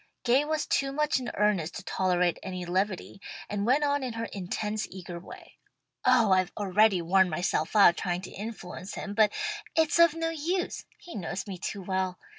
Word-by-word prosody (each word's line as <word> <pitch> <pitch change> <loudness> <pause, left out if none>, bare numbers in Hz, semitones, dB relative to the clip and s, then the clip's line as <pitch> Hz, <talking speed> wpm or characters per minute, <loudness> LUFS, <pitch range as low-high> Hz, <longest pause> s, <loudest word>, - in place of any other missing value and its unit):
Gay 255 +4 +4
was 310 0 -1
too 275 0 0
much 300 -1 +1
in 250 - -4
earnest 200 -6 +1
to - - -6
tolerate 180 -2 +1
any 185 -2 -5
levity, 190 +2 -2 0.3
and 205 +1 -2
went 275 +4 +3
on 285 0 +1
in 255 -3 -3
her 230 0 -3
intense 210 +3 -3
eager 180 -2 -8
way. 175 - -13 0.4
"Oh 250 -5 +4
I've 185 0 +3
already 200 -2 +3
worn 190 +2 +4
myself 160 +1 -1
out 195 -4 +7
trying 175 -1 -2
to - - -8
influence 200 -3 -7
him, 205 - -5
but 215 0 +4 0.4
it's 320 +1 +3
of 335 -2 +6
no 330 0 -1
use. 340 +4 -2
He 345 - -12
knows 190 0 -4
me 190 -3 -7
too 195 +2 -4
well. 185 -1 -1
205 Hz, 185 wpm, -28 LUFS, 185-255 Hz, 0.4 s, out